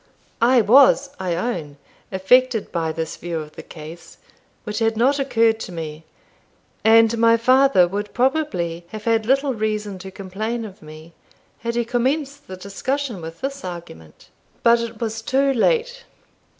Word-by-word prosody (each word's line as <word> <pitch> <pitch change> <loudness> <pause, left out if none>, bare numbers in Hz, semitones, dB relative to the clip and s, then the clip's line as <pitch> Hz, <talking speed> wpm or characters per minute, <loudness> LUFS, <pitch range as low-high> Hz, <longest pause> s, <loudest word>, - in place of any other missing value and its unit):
I 245 +1 +5
was, 270 +5 +5
I 180 -2 -1
own, 165 -8 -4 0.3
affected 225 +4 +2
by 165 -2 -1
this 160 0 -5
view 170 -1 -4
of 150 -1 -8
the - - -8
case, 160 +2 -12 0.5
which 210 0 -4
had 225 -1 +1
not 270 +5 +3
occurred 230 -4 +2
to 190 - -7
me; 160 -2 -7 0.8
and 225 +1 +5
my 230 0 +5
father 255 -5 +4
would 205 +3 -4
probably 230 - -1
have 215 +3 -8
had 225 -1 +1
little 275 +1 +2
reason 215 -3 -3
to 190 +1 -8
complain 215 +5 -4
of 195 -3 -12
me, 155 +2 -13 0.5
had 235 0 -3
he 240 0 0
commenced 275 +4 -1
the 185 - -8
discussion 225 +4 -3
with 165 +1 -9
this 275 +1 -4
argument. 170 - -10 0.3
But 235 0 +5
it 230 -1 -5
was 225 -1 -3
too 270 +4 +1
late. 485 - +1
225 Hz, 155 wpm, -21 LUFS, 180-255 Hz, 0.8 s, I